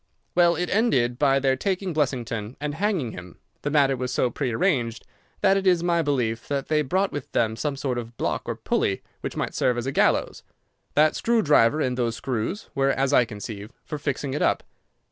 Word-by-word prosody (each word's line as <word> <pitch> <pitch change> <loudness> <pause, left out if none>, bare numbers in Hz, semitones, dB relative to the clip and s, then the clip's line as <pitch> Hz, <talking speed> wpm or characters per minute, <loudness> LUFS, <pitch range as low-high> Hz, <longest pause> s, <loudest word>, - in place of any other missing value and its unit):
"Well, 175 -1 +4
it 180 +2 -2
ended 130 - +2
by 135 -2 +4
their 135 -1 +2
taking 185 +4 -2
Blessington 125 -6 -2
and 150 0 -3
hanging 175 - -1
him. 90 -2 -10 0.2
The 145 - -2
matter 140 -2 +3
was 125 0 -3
so 125 - +1
prearranged 125 -3 0 0.4
that 195 0 +4
it 195 -1 -1
is 175 -2 +4
my 170 -1 +2
belief 120 -6 -1
that 140 -1 -2
they 155 -1 +3
brought 185 +8 0
with 145 - -6
them 110 -1 +1
some 145 +4 -2
sort 130 -3 -2
of 115 0 -9
block - - -1
or - - -2
pulley 95 - -1 0.2
which - - -5
might - - -2
serve 125 -1 +1
as 120 - -2
a 135 - -1
gallows. - - +1 0.5
That 155 +1 +4
screw 230 -1 +2
driver 145 -2 +4
and 125 -2 -1
those 115 -2 0
screws 130 - -3
were, 135 0 +2
as 135 +1 +1
I 125 - +5
conceive, 105 0 -8
for 150 - -5
fixing 140 -1 -2
it 145 - -2
up. - - +2
135 Hz, 205 wpm, -25 LUFS, 120-155 Hz, 0.5 s, I